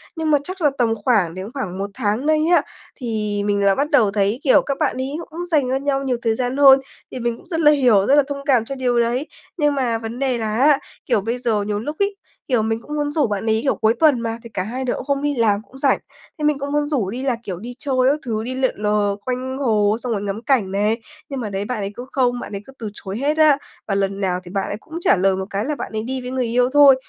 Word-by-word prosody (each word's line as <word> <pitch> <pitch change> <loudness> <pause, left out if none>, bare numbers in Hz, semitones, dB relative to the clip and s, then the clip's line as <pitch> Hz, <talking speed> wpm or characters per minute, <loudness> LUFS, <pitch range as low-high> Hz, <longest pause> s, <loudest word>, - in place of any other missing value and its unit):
Nhưng 320 -1 -1
mà 295 - +6
chắc 370 +1 -7
là 295 -2 +4
tầm 230 -2 +2
khoảng 200 -10 +3
đến 190 +4 -6
khoảng 190 -10 -4
1 200 +1 -3
tháng 225 +2 -1
nay 310 0 +3 0.2
á, 300 - +5 0.3
thì 215 -4 -2
mình 200 -1 +1
là 195 - +4
bắt 290 +2 0
đầu 225 -9 +4
thấy, 205 +4 +1
kiểu, 265 - +5
các 275 -1 -2
bạn 300 -5 0
ấy 260 +1 -2 0.2
cũng 325 +3 -9
dành 285 -5 +2
cho 260 - +1
nhau 275 0 0
nhiều 255 -3 0
thời 225 -1 +1
gian 250 +2 -2
hơn, 275 -1 +8 0.3
thì 255 - -5
mình 235 -1 -1
cũng - - -18
rất 325 -2 -1
là 300 -2 +6
hiểu, 245 -9 +4
rất 280 - +5
là 290 - +6
thông 280 -1 -5
cảm 250 -6 +3
cho 275 - -5
điều 245 -2 +1
đấy. 245 +6 0 0.3
Nhưng 295 -3 +2
mà 245 -4 0
vấn 225 +2 -6
đề 265 -3 0
là 215 -2 -2
á, 285 +2 +5 0.3
kiểu, 205 - +2
bây 230 +4 -2
giờ 225 -4 0
nhiều 205 0 -2
lúc 295 +8 -4
ấy, 400 0 +1 0.3
kiểu, 245 -5 +2
mình 225 +1 -1
cũng 300 +4 -6
muốn 290 -1 -1
rủ 295 -5 +2
bạn 205 +1 -3
ấy, 220 0 +2
kiểu, 275 - +2
cuối 220 +1 +2
tuần 300 -6 +5
mà 230 0 -3
thì 230 - -10
cả 185 - -1
hai 250 +6 -4
đứa 250 - 0
cũng - - -5
không 280 -1 0
đi 290 -1 0
làm, 215 -4 +2
cũng 260 +4 -16
rảnh, 270 0 +2 0.4
thế 305 - -5
mình 300 -2 +2
cũng 280 +1 -4
muốn 295 0 +1
rủ 245 -11 0
đi 250 +5 -5
là, 265 -3 +1
kiểu, 185 -3 -5
đi 240 +4 -7
chơi 270 -2 -2 0.2
các 300 - -1
thứ, 220 -2 -2
đi 255 +2 -4
lượn 260 -1 0
lờ 210 -1 +1
quanh 255 +1 -3
hồ 215 -5 +2
xong 245 - -2
rồi 205 -2 -1
ngắm 205 +2 -3
cảnh 235 -9 +1
này, 210 +4 0 0.3
nhưng 275 -2 -4
mà 215 -4 -3
đấy, 195 +1 -3
bạn 250 +1 -3
ấy 200 0 -3
cứ 245 - -7
không 245 -2 +1
bạn - - -7
ấy 200 - -5
cứ 270 - -14
từ 220 -2 -4
chối 195 0 -6
hết 295 +4 0
á. 305 -3 +6 0.3
Và 195 - 0
lần 195 0 -1
nào 180 -1 0
thì 175 - -11
bạn 195 0 -1
ấy 205 - -4
cũng 320 - -18
trả - - +4
lời 190 +1 +3
một 190 0 -3
cái 200 +4 -2
là 300 - -1
bạn - - -6
ấy 215 -1 -3
đi 260 +2 -4
với 250 - -6
người 255 -2 0
yêu 245 +2 +2
thôi. 285 -2 +8
245 Hz, 290 wpm, -21 LUFS, 210-275 Hz, 0.4 s, hơn